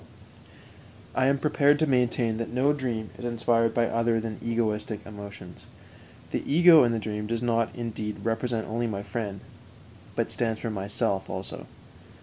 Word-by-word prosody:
I 130 Hz, -, +2 dB
am 140 Hz, +1 st, +3 dB
prepared 145 Hz, 0 st, +3 dB
to 155 Hz, -, +2 dB
maintain 125 Hz, -4 st, +1 dB
that 115 Hz, -, -4 dB
no 130 Hz, +4 st, +3 dB
dream 120 Hz, -6 st, -3 dB
is -, -, -8 dB
inspired 115 Hz, -1 st, +1 dB
by 120 Hz, -, +3 dB
other 115 Hz, 0 st, +1 dB
than 110 Hz, -1 st, -5 dB
egoistic 110 Hz, -2 st, -1 dB
emotions. 100 Hz, -4 st, -10 dB, 0.6 s
The -, -, -1 dB
ego 165 Hz, -1 st, +8 dB
in 120 Hz, -, +3 dB
the 115 Hz, -, 0 dB
dream 105 Hz, -1 st, -3 dB
does 115 Hz, +1 st, -2 dB
not, 115 Hz, -1 st, +2 dB
indeed, 110 Hz, -3 st, -5 dB
represent 115 Hz, 0 st, -1 dB
only 120 Hz, +2 st, -1 dB
my 100 Hz, -2 st, -3 dB
friend, 100 Hz, -4 st, -4 dB, 0.7 s
but -, -, -1 dB
stands 115 Hz, -2 st, -1 dB
for 115 Hz, -, -3 dB
myself 100 Hz, -1 st, -1 dB
also. -, -, -6 dB
115 Hz, 155 wpm, -27 LUFS, 110-120 Hz, 0.7 s, ego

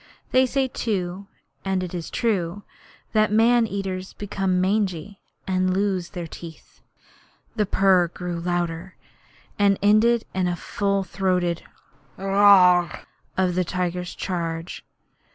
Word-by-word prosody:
They 260 Hz, 0 st, +4 dB
say 270 Hz, +1 st, 0 dB
too 195 Hz, -5 st, -3 dB, 0.4 s
and 190 Hz, -1 st, -1 dB
it 180 Hz, -, -6 dB
is 170 Hz, -2 st, -5 dB
true 205 Hz, -4 st, -1 dB, 0.5 s
that 215 Hz, -1 st, +3 dB
man 230 Hz, +2 st, +4 dB
eaters 190 Hz, -2 st, -4 dB
become 195 Hz, -2 st, -1 dB
mangy, 195 Hz, 0 st, -1 dB, 0.2 s
and 185 Hz, -1 st, +1 dB
lose 190 Hz, -3 st, 0 dB
their 175 Hz, -3 st, -6 dB
teeth. 165 Hz, -1 st, -12 dB, 0.7 s
The 210 Hz, -3 st, 0 dB
purr 190 Hz, -3 st, +4 dB
grew 175 Hz, 0 st, -5 dB
louder, 175 Hz, +1 st, -3 dB, 0.6 s
and 200 Hz, -1 st, +4 dB
ended 220 Hz, +3 st, +4 dB
in 185 Hz, -1 st, 0 dB
the 175 Hz, -, -1 dB
full 200 Hz, +3 st, -1 dB
throated 180 Hz, -2 st, -1 dB, 0.6 s
'Aaarh!' 195 Hz, -3 st, +5 dB, 0.3 s
of 185 Hz, -1 st, +2 dB
the 185 Hz, +1 st, +1 dB
tiger's 180 Hz, 0 st, -3 dB
charge. 170 Hz, -2 st, -4 dB
185 Hz, 120 wpm, -23 LUFS, 175-205 Hz, 0.7 s, Aaarh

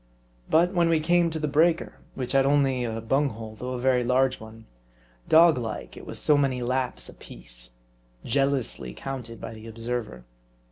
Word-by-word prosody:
But 175 Hz, +3 st, +4 dB
when 170 Hz, -2 st, +3 dB
we 165 Hz, -1 st, +3 dB
came 175 Hz, +2 st, +3 dB
to 160 Hz, -, -4 dB
the 155 Hz, -1 st, -1 dB
breaker, 160 Hz, +3 st, +2 dB, 0.2 s
which 125 Hz, -2 st, -4 dB
had 135 Hz, -1 st, +4 dB
only 135 Hz, -2 st, +2 dB
a 115 Hz, -1 st, -3 dB
bung 135 Hz, +6 st, +1 dB
hole, 110 Hz, -2 st, -8 dB
though 125 Hz, +1 st, -4 dB
a 125 Hz, -, -3 dB
very 125 Hz, -1 st, +2 dB
large 130 Hz, +1 st, +2 dB
'one, 110 Hz, 0 st, -12 dB, 0.6 s
dog 160 Hz, -3 st, +6 dB
like, 115 Hz, -2 st, -5 dB
it -, -, -11 dB
was -, -, -7 dB
so 150 Hz, -, +3 dB
many 135 Hz, -3 st, +1 dB
laps 125 Hz, -, -1 dB
apiece; -, -, -9 dB, 0.5 s
jealously 135 Hz, -, -1 dB
counted 125 Hz, -4 st, -6 dB
by 115 Hz, -, -7 dB
the 110 Hz, 0 st, -11 dB
observer. 115 Hz, -, -5 dB
130 Hz, 175 wpm, -26 LUFS, 115-145 Hz, 0.6 s, dog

